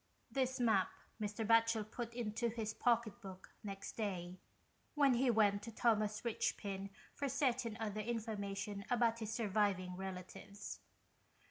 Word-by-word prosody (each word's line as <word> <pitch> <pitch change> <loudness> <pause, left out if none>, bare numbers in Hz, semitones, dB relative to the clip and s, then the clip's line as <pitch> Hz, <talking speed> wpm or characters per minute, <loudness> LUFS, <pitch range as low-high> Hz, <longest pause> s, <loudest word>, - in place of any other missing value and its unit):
This 260 -1 0
map 220 -6 +4 0.3
Mr. 210 +1 -1
Batchel 230 -1 +4
put 235 -1 -4
into 235 0 0
his 220 -1 -3
pocket 235 -1 +1
book 190 -2 -10
next 195 -1 -5
day 185 -4 -3 0.6
when 280 -3 +5
he 250 +2 +3
went 205 -3 +4
to 230 - -7
Thomas 215 -2 +2
Richpin 200 -3 -1 0.2
for 280 -1 -1
certain 250 -4 +1
other 215 -1 -2
information 205 -3 -3
about 230 -1 +3
his 220 -1 -3
surviving 205 -5 +1
relatives. 190 +2 -6
215 Hz, 130 wpm, -38 LUFS, 200-235 Hz, 0.6 s, when